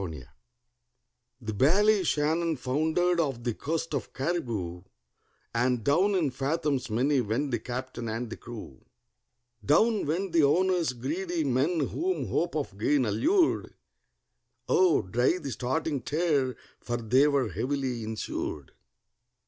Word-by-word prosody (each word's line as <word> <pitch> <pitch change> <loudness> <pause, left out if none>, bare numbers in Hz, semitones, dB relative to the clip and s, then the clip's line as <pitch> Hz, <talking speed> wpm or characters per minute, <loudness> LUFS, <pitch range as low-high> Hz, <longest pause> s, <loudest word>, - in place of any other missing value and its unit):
THE 110 -3 -5
Ballyshannon 165 - +2
foundered 160 +7 +1
off 135 -7 -1
the 120 -1 -1
coast 160 +6 -3
of 135 -5 -3
Cariboo, 120 - -2 0.7
And 120 0 +1
down 180 - +3
in 160 -7 +1
fathoms 140 -2 -1
many 130 +5 +2
went 120 +6 -1
the 120 - 0
captain 125 0 -5
and 115 +1 -4
the - - -4
crew; 115 - -10 0.8
Down 210 - +3
went 180 +5 -1
the 165 - +5
owners—greedy 170 +1 +1
men 145 +5 +1
whom 370 +3 -2
hope 170 -1 0
of 135 -10 -3
gain 135 +3 +2
allured: 325 - +1 0.9
Oh, 380 -6 +4
dry 120 - +1
the 145 -6 -6
starting 135 +4 -2
tear, 145 -3 0 0.2
for 120 0 -3
they 125 +5 +3
were 140 -3 +1
heavily 130 -3 -2
insured. 110 -9 -4
140 Hz, 120 wpm, -28 LUFS, 120-170 Hz, 0.9 s, the